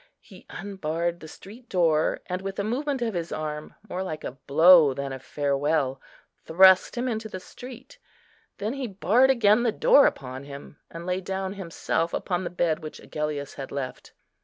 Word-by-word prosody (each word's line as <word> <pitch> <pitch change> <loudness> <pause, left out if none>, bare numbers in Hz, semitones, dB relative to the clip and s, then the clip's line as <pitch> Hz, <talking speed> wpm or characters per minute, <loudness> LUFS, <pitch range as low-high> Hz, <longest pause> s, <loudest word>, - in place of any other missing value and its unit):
He - - -17
unbarred 170 -3 -3
the 160 - -10
street 220 +9 -13
door, 165 -4 +2
and 180 0 -4
with 195 0 -5
a 200 - -1
movement 265 +4 -2
of 225 -2 -2
his 170 -2 -4
arm, 150 0 -5
more 185 -1 -4
like 155 -5 -5
a - - -4
blow 145 +2 +5
than 140 -1 -4
a 130 - -6
farewell, 140 0 -1 0.4
thrust 190 +6 +5
him 245 +2 -1
into 220 -2 -3
the 185 - -6
street. 255 - -12 0.6
Then 210 +4 -3
he 270 -2 -4
barred 210 +7 +3
again 230 -3 +4
the 235 -2 +2
door 280 +5 +5
upon 130 +1 -5
him, 140 +1 -11
and 170 +1 -8
lay 180 +1 -1
down 190 +1 -3
himself 170 -3 -2
upon 180 -1 -2
the - - -3
bed 170 -2 0
which 155 -2 -9
Agellius 150 -2 -4
had 135 - -8
left. 135 -2 -6
175 Hz, 180 wpm, -26 LUFS, 150-205 Hz, 0.6 s, blow